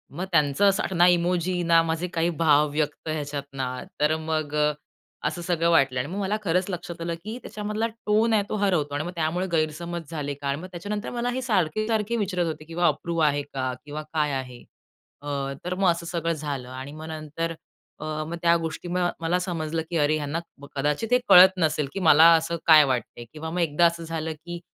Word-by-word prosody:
मग 180 +4 -3
त्यांचं 150 +2 +3
असं 190 -1 -1
ना 175 +1 +6
इमोजी, 175 0 +1
ना 165 -1 +5
माझे 165 +2 -2
काही 165 0 +1
भाव 150 -2 +4
व्यक्त 150 +1 -2
ह्याच्यात 145 -2 -3
ना, 135 -1 -2 0.3
तर 150 +1 +3
मग 155 -2 -2 0.7
असं 175 - -2
सगळं 170 -1 +1
वाटलं. 135 -5 +3
आणि 125 - -2
मग 190 +4 -4
मला 200 +1 0
खरंच 180 0 +1
लक्षात 175 -2 -6
आलं, 170 0 -2
की 220 +4 -5
त्याच्यामधला 210 +2 -3
टोन 225 0 +1
आहे 210 -2 +3
तो - - -2
हरवतो 160 -7 +1
आणि 145 - -1
मग 175 - -4
त्यामुळे 170 +3 -1
गैरसमज 165 +1 -2
झाले 145 -3 -3
का? 140 0 -6
आणि 140 +2 -1
मग 185 - -7
त्याच्यानंतर 205 +4 -4
मला 240 0 -2
हे 260 +1 -2
सारखे-सारखे 215 +1 0
विचारत 185 -4 0
होते, 155 -1 -5
की 165 +1 -10
अप्रूव्ह 170 -1 +1
आहे 145 -1 +2
का? 130 -1 -2
किंवा 150 +1 -5
काय 150 -2 +1
आहे? 125 -2 -5 0.6
अ, 140 -1 -3
तर 180 - -1
मग 190 -1 +3
असं 170 0 -4
सगळं 170 -1 -1
झालं. 145 -5 -5
आणि 130 +2 -7
मग 155 +1 -8
नंतर 160 +1 -4 0.4
अ, 155 - -6 0.2
मग 170 - -4
त्या 170 0 +4
गोष्टी 165 +1 -5 0.3
मला 165 +2 +1
समजलं, 165 -3 -2
की 170 - -1
अरे 150 0 +3
ह्यांना 150 +2 -2 0.4
कदाचित 150 +10 -1
हे - - +7
कळत 180 +1 +10
नसेल, 155 -4 +1
की 195 - -3
मला 160 -3 +6
असं 165 +1 -1
काय 155 -2 +9
वाटतंय. 120 -2 -3
किंवा 160 +1 -6
मग 175 +2 -3
एकदा 165 +1 +3
असं 170 0 -4
झालं, 160 -1 -3
की 175 +3 -8
165 Hz, 200 wpm, -25 LUFS, 150-180 Hz, 0.7 s, कळत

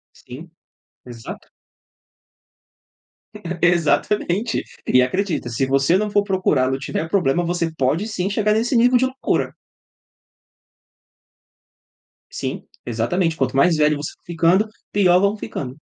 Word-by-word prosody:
Sim, 155 +7 -12 0.5
exato. 120 -2 -10 2.1
Exatamente. 175 +5 +1 0.2
E 125 - +5
acredita, 165 -1 -1
se 120 +3 -1
você 135 +6 +2
não 210 +1 -1
for 205 0 +3
procurá-lo 150 -10 +1
e - - -6
tiver 160 +3 -4
problema 175 -3 +1
você 170 -1 -1
pode 155 +9 0
sim 195 -3 -2
chegar 210 +1 +1
nesse 230 +4 0
nível 245 +2 +4
de 260 - +2
loucura. 260 +1 -2 2.8
Sim, - - -5 0.2
exatamente, 175 -3 -1
quanto 135 -1 -1
mais 165 +3 +4
velho 150 0 +3
você 150 - -5
for - - -31
ficando, 170 +5 +2 0.2
pior 180 -3 +4
vão 200 +2 +1
ficando. 130 -9 -6
175 Hz, 120 wpm, -21 LUFS, 145-205 Hz, 2.8 s, E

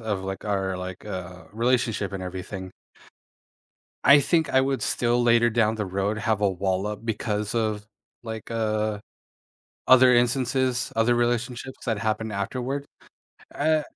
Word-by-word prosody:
of, 105 -4 -3
like, 95 0 -5
our, 95 -3 -1
like, 90 +1 -7
uh, 90 -2 -7
relationship 115 -3 0
and 95 - -5
everything 95 +1 -6 1.3
I 140 +1 +8
think 160 +2 +2
I 130 - +4
would 135 0 -1
still 120 0 +1
later 120 0 +4
down 110 -1 +2
the 110 -2 -2
road 100 +3 -1
have 110 -1 0
a 100 - +3
wall 95 +1 -1
up 105 +1 -5
because 105 -1 -2
of 110 -2 -1 0.4
like, 110 -1 -7
uh, 110 -2 -1 0.9
other 130 0 +7
instances, 125 0 +1
other 115 +2 +3
relationships 120 +2 -2
that 115 -4 0
happened 110 0 -1
afterward. 125 +8 -3 0.7
Eh 155 +1 +2
110 Hz, 140 wpm, -25 LUFS, 100-120 Hz, 1.3 s, I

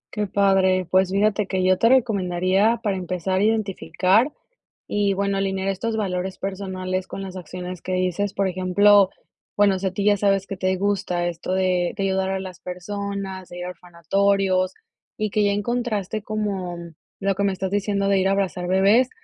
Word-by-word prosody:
Qué 210 -1 -1
padre. 190 -2 +3
Pues, 185 0 +4
fíjate 205 +1 +1
que 190 -1 -1
yo 185 0 +3
te 230 - +4
recomendaría, 200 -3 +2
para 200 -3 0
empezar 185 +1 -2
a 200 - +2
identificar, 215 +2 +2 0.6
y 205 -1 +1
bueno 200 0 0
alinear 195 0 -1
estos 220 +4 -2
valores 190 -2 -2
personales, 190 -1 -3
con - - -7
las 190 -1 -7
acciones 180 0 -7
que 185 - -4
dices. 185 +2 0
Por 195 -1 0
ejemplo, 190 +2 +4 0.4
bueno, 200 -2 +3
si 195 - -3
a - - +1
ti 200 +2 -2
ya 205 - +5
sabes 195 -1 +1
que 195 - -5
te 185 0 0
gusta, 190 -3 -1
esto 175 +1 -5
de 185 -2 +1
de 200 - -4
ayudar 190 0 0
a 190 0 -1
las 185 -1 -8
personas, 190 0 -5
de 175 - -8
ir 180 - -5
a - - -4
orfanatorios, 185 +2 0 0.5
y 215 - 0
que 210 +1 +1
ya 200 - +2
encontraste, 215 -1 -2
como 200 -5 -3 0.4
lo 195 0 +1
que 200 +1 -1
me 200 - +2
estás 190 0 -3
diciendo 200 0 0
de 195 -1 +3
ir 190 - +2
a - - +2
abrazar 190 -2 -1
bebés, 200 +7 +4
195 Hz, 185 wpm, -23 LUFS, 185-200 Hz, 0.6 s, ya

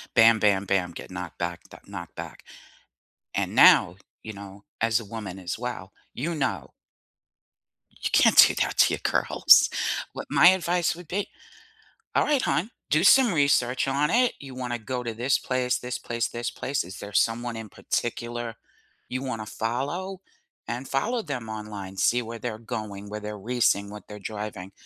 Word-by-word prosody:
bam, 115 0 +6
bam, 100 -2 +2
bam, 95 -2 0
get 85 - -10
knocked 90 -2 -7
back, 85 0 -3
d - - -12
knocked 85 -2 -9
back, - - -8 0.9
and - - -2
now, - - +7 0.3
you 110 - -7
know, 100 0 -11 0.2
as 115 0 +3
a 115 - -9
woman 100 -3 -7
as 90 -1 -4
well, 120 -5 -6 0.2
you 165 +6 -3
know 135 -3 -2 1.3
you - - 0
can't - - +5
do - - +9
that - - -4
to - - +5
your - - -2
girls. - - +5 0.4
What - - -6
my 175 - +7
advice 175 -2 +1
would 175 -1 -12
be, 195 +5 -2 0.9
all - - +3
right, 290 -4 +2
hon, 205 +7 0 0.2
do 155 +3 +3
some 245 +1 +6
research 140 -5 +2
on 140 +2 +1
it. 245 +1 +3
You 135 -2 -9
wanna 125 -2 -3
go 125 +3 -4
to 115 -2 -4
this 125 +4 +1
place, 125 -1 -1
this 125 0 -5
place, 115 0 -2
this 120 0 -4
place, 135 0 -2
is 95 +3 -9
there 100 - -8
someone 115 +3 +1
in 110 -1 -7
particular 120 +2 -3 0.5
you 130 +1 -3
wanna 115 -5 -4
follow 145 - -3 0.5
and 120 +3 -4
follow 230 - 0
them 125 - -5
online, 105 -3 -7
see 120 +5 +2
where 115 0 -7
they're 110 0 -5
going, 110 -3 -6
where 105 +1 -6
they're 105 0 -6
racing, 100 -2 +1
what 105 -2 -10
they're 105 - -8
driving, 105 -2 -6
115 Hz, 175 wpm, -26 LUFS, 105-135 Hz, 1.3 s, do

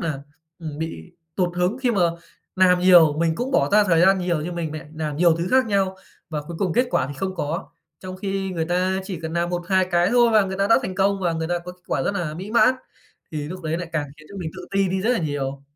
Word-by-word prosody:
nà, 150 -5 -3 0.4
ừm, 155 -3 -7
bị 160 - -6 0.2
tụt 175 -2 0
hứng 180 +8 0
khi 255 -2 +1
mà 200 - 0 0.6
làm 180 -1 +5
nhiều, 170 -5 +6
mình 165 -1 +1
cũng 250 +7 -3
bỏ 270 - +2
ra 210 0 +6
thời 170 -4 +3
gian 190 +2 +5
nhiều 175 -3 -1
như 175 +3 -4
mình 165 -3 -4
mẹ 155 0 -7
làm 155 -2 -3
nhiều 170 0 +4
thứ 170 +2 -2
khác 260 -1 +4
nhau 195 -3 0 0.3
và 150 -2 -3
cuối 165 +2 -8
cùng 190 -4 0
kết 250 +1 +3
quả 130 - +1
thì 145 - -7
không 190 +4 -3
có. 165 +2 -4 0.3
Trong 185 0 -7
khi 195 0 -3
người 165 -3 -2
ta 185 +2 0
chỉ 185 -4 -6
cần 160 0 -4
làm 170 +1 -1
1-2 180 +1 +1
cái 175 +1 +3
thôi 240 -1 +4
và 215 -2 +5
người 190 0 -4
ta 195 - +2
đã 225 - +5
thành 185 -6 -4
công, 195 +1 +1
và 175 -2 0
người 160 0 -3
ta 175 - 0
có 175 +1 -9
kết 180 0 -24
quả - - -1
rất - - 0
nà 170 -5 -3
mỹ 190 +5 -7
mãn, 235 +3 +5 0.6
thì 150 -2 -3
lúc 185 0 -7
đấy 160 +1 -2
lại 175 -1 -5
càng 150 -2 -1
khiến 155 0 -16
cho 200 - -9
mình 175 -4 -4
tự - - -8
ti 195 -1 +1
đi 190 +1 -1
rất 220 +5 +1
là - - +1
nhiều. 140 -3 -3
180 Hz, 275 wpm, -23 LUFS, 160-195 Hz, 0.6 s, nhiều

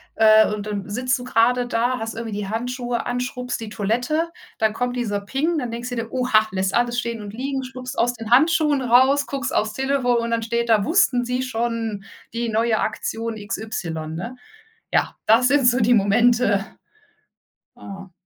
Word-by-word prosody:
äh, 220 -1 +6
und 210 -1 -5
dann 205 -1 -4
sitzt 250 +4 0
du 245 - -8
grade 245 +1 +2
da, 245 +1 0
hast 225 0 -4
irgendwie 225 -2 -5
die 205 -1 -4
Handschuhe 245 +1 -3
an, 245 0 -2
schrubbst 250 -1 -4
die 225 - -6
Toilette. 245 +11 -1 0.3
Dann 220 -1 +1
kommt 245 +2 -2
dieser 205 -4 -2
Ping. 285 +11 -1
Dann 245 -4 -4
denkst 240 +1 -5
du 245 - -4
dir: 230 -1 -4
„Oha“, 235 -4 +2
lässt 190 0 -1
alles 240 0 +1
stehen 235 -2 -4
und 205 - -7
liegen, 265 +2 -3
schlupfst 255 0 -7
aus 245 +1 +2
den 225 -2 -8
Handschuhen 300 +1 +4
raus, 260 +3 +4
guckst 275 0 -3
aufs 215 0 0
Telefon, 265 -1 +1
und 235 0 -2
dann 230 -1 0
steht 235 +1 -1
da: 220 -3 +4
„Wussten 275 - +3
Sie 250 +1 -2
schon, 230 -4 -3 0.3
die 235 0 -2
neue 220 0 +1
Aktion 225 +1 -3
XY“, 215 -4 -5 0.2
ne? 230 +10 -6 0.6
Ja, - - +1
das 235 +3 +5
sind 280 -3 +4
so 245 +1 +4
die 235 +1 +4
Momente, 215 -1 +3 1.1
ja. 195 -1 -10
235 Hz, 185 wpm, -22 LUFS, 220-250 Hz, 1.1 s, äh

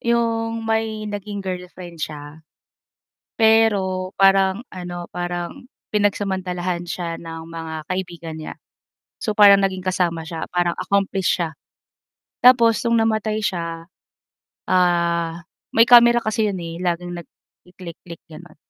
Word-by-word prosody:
yung 230 -1 0
may 220 -1 -1
naging 205 -1 -5
girlfriend 180 -2 -7
siya. 150 0 -7 1.0
Pero 200 -5 +3
parang 195 +1 +4
ano, 175 -1 -7
parang 175 +3 -5 0.3
pinagsamantalahan 185 -4 -1
siya 170 -1 -4
ng 165 -1 -9
mga 165 -1 -7
kaibigan 175 -3 -5
niya. 155 - -7 0.7
So, 215 - 0
parang 200 -2 +7
naging 190 -1 -1
kasama 170 -3 -1
siya, 165 -2 -5
parang 175 -1 0
accomplish 195 0 0
siya. 165 -2 -2 0.8
Tapos 235 -2 +5
no'ng 230 -1 +3
namatay 220 -1 0
siya, 170 -3 -3 0.8
ah, 170 -2 +1 0.4
may 230 - +8
camera 240 -1 +6
kasi 215 0 0
'yon, 195 - -3
eh, 165 +1 -7
laging 175 0 -2
nagki-click-click, 170 -1 -14
gano'n. 165 +1 -14
185 Hz, 115 wpm, -21 LUFS, 170-210 Hz, 1.0 s, may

